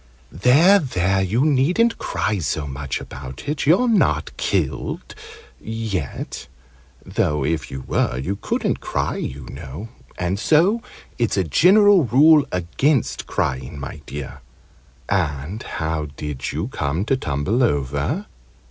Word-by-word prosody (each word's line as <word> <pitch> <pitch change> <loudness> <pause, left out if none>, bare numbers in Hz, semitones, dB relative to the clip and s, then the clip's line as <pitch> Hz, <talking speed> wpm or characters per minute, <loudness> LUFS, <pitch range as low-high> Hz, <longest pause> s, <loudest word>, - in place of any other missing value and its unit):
"There, 145 - +5
there! 95 - 0
You 110 +9 +1
needn't 160 - +2
cry 105 -2 -1
so 75 -1 -2
much 70 -1 -4
about 65 0 -9
it. 145 -1 -2
You're 185 +11 +5
not 135 - +2
killed - - -2 0.5
yet 110 - -4 0.6
though 75 -2 0
if 80 -1 -1
you 65 0 -6
were, - - 0
you 80 +10 -2
couldn't - - -1
cry, - - -2
you 65 0 -5
know, 75 - -8 0.3
and 90 +3 -1
so 180 - +3 0.4
it's 115 -3 +1
a 95 - +3
general 190 - +5
rule 145 +4 +6
against 115 - 0
crying, 65 +2 -2
my 70 +2 -7
dear! 70 0 -7 0.7
And 85 +1 -1
how 80 -1 -3
did 75 -3 -4
you 80 - -3
come 80 - -2
to 135 - +2
tumble 90 - -1
over? 70 - 0
95 Hz, 130 wpm, -21 LUFS, -, 0.7 s, rule